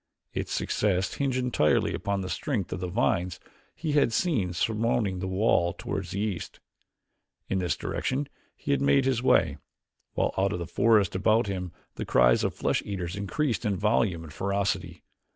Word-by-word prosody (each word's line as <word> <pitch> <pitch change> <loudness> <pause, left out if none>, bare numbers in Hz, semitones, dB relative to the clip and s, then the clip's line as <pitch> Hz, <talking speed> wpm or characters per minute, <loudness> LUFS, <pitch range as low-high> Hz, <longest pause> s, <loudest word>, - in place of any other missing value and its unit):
Its - - -3
success 95 -2 0
hinged 135 -2 -1
entirely 125 -12 +2
upon 100 -1 -2
the 95 - -4
strength 110 - -2
of 90 - -4
the 90 - -3
vines 90 -3 0 0.4
he 160 -1 -3
had 145 -5 +3
seen 115 - +1
surmounting 110 +1 0
the 95 - -3
wall 95 -3 +2
toward 95 -1 -4
the 90 +3 -4
east. 100 -5 -3 0.9
In 95 - +1
this 90 -2 0
direction 135 +2 -2 0.3
he 140 - 0
made 140 -1 +3
his 130 -3 +1
way, 80 - +3 0.6
while - - +1
from 95 - -1
out 100 - +1
of - - -2
the 85 - -4
forest 105 0 +3
about 110 +5 +3
him 90 -3 -4 0.3
the - - -3
cries - - +4
of - - 0
the - - -25
flesh - - +1
eaters 95 -3 -4
increased 115 +7 -1
in 105 -4 0
volume 100 -4 +1
and 75 -2 -10
ferocity. 95 -2 -2
100 Hz, 175 wpm, -27 LUFS, 90-115 Hz, 0.9 s, cries